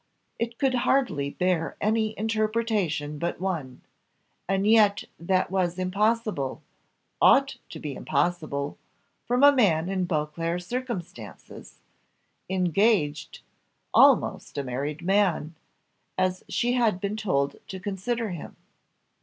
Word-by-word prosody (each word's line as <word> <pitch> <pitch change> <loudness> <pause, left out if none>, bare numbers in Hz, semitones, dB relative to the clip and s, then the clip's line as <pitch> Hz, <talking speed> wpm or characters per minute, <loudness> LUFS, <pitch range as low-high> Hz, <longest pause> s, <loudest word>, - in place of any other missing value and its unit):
It 230 0 -3
could 270 -2 +1
hardly 240 - +1
bear 180 +1 -1
any 220 0 0
interpretation 215 -9 -1
but 170 - -2
one 165 -9 -4 0.7
and 195 0 +1
yet 210 -2 +4 0.2
that 185 +3 0
was 180 -2 0
impossible 200 - -1 0.6
ought - - +5
to - - -8
be 145 -2 -5
impossible 150 0 -2 0.5
from 250 +3 +2
a 285 - +9
man 175 -8 +3
in 190 -2 0
Beauclerc's 165 +2 -2
circumstances 185 - -7 0.7
engaged 185 -3 +1 0.5
almost - - +4
a 140 - -1
married 140 +5 -4
man, 185 -4 +1 0.6
as 185 0 0
she 245 0 0
had 230 -7 +2
been 200 +2 -2
told 140 -10 -1
to 190 - -7
consider 205 +3 -3
him. 170 - -8
185 Hz, 110 wpm, -26 LUFS, 155-215 Hz, 0.7 s, a